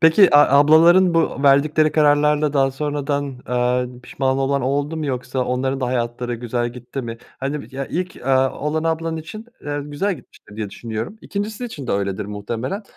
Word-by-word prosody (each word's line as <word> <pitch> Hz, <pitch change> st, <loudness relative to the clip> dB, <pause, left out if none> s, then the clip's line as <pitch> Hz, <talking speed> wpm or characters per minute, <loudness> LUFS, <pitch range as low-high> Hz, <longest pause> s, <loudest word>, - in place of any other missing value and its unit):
Peki, 165 Hz, +2 st, +6 dB
a 140 Hz, -1 st, +6 dB
ablaların 170 Hz, +5 st, +6 dB
bu 165 Hz, -4 st, +1 dB
verdikleri 150 Hz, +2 st, +4 dB
kararlarla 150 Hz, 0 st, +3 dB
daha 135 Hz, -2 st, +3 dB
sonradan, 145 Hz, 0 st, -2 dB
eee, 125 Hz, 0 st, 0 dB
pişman 130 Hz, +1 st, -1 dB
olan 135 Hz, 0 st, 0 dB
oldu 145 Hz, +4 st, -1 dB
mu 155 Hz, -2 st, -3 dB
yoksa 125 Hz, 0 st, -3 dB
onların 130 Hz, +2 st, -1 dB
da 125 Hz, -, 0 dB
hayatları 120 Hz, 0 st, -2 dB
güzel 120 Hz, 0 st, -2 dB
gitti 125 Hz, +2 st, -7 dB
mi? 115 Hz, -1 st, -6 dB, 0.2 s
Hani, 140 Hz, +2 st, -3 dB
ya, 135 Hz, 0 st, -3 dB
ilk, 180 Hz, +2 st, -4 dB
aaa, 130 Hz, 0 st, +3 dB
olan 155 Hz, +2 st, -1 dB
ablan 165 Hz, 0 st, -1 dB
için, 215 Hz, +8 st, -8 dB, 0.2 s
eee, 145 Hz, 0 st, -2 dB
güzel 150 Hz, +8 st, -1 dB
gitmiştir, 105 Hz, -7 st, -17 dB
diye 105 Hz, -2 st, -4 dB
düşünüyorum. 115 Hz, -, -6 dB
2'ncisi 205 Hz, +3 st, -4 dB
için 150 Hz, -, -7 dB
de -, -, -1 dB
öyledir 100 Hz, 0 st, -1 dB
muhtemelen 115 Hz, -, -4 dB
140 Hz, 170 wpm, -21 LUFS, 125-155 Hz, 0.2 s, Peki